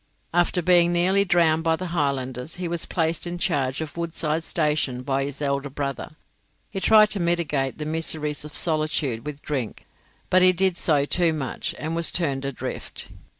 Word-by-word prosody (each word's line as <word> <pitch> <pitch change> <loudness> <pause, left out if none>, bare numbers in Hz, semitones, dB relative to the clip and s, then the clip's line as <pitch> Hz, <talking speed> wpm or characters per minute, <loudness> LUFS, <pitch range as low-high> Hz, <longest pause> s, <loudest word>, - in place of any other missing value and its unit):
After 175 +1 +2
being 175 0 +4
nearly 185 +3 +3
drowned 165 -3 +3
by 165 0 +2
the 185 - -6
Highlanders 135 -3 -2
he 180 -1 -4
was 170 -1 0
placed 165 0 0
in 175 0 -4
charge 135 -4 0
of 155 -2 -6
Woodside 165 -2 -1
station 150 -6 0
by 135 0 0
his 140 +1 -5
elder 140 0 -1
brother; 140 +2 -5 0.6
he 195 - -3
tried 215 +2 +5
to 200 - 0
mitigate 165 -6 0
the 150 - -5
miseries 155 -2 -2
of 150 - -8
solitude 155 -7 0
with 145 -1 -7
drink, 130 -7 -4 0.5
but 185 - +5
he 185 0 +6
did 185 0 +1
so 150 -5 +2
too 170 +1 +2
much 140 -4 -4
and 160 +2 -3
was 170 0 +2
turned 140 -6 -1
adrift. 140 -2 -5
155 Hz, 175 wpm, -24 LUFS, 140-175 Hz, 0.6 s, he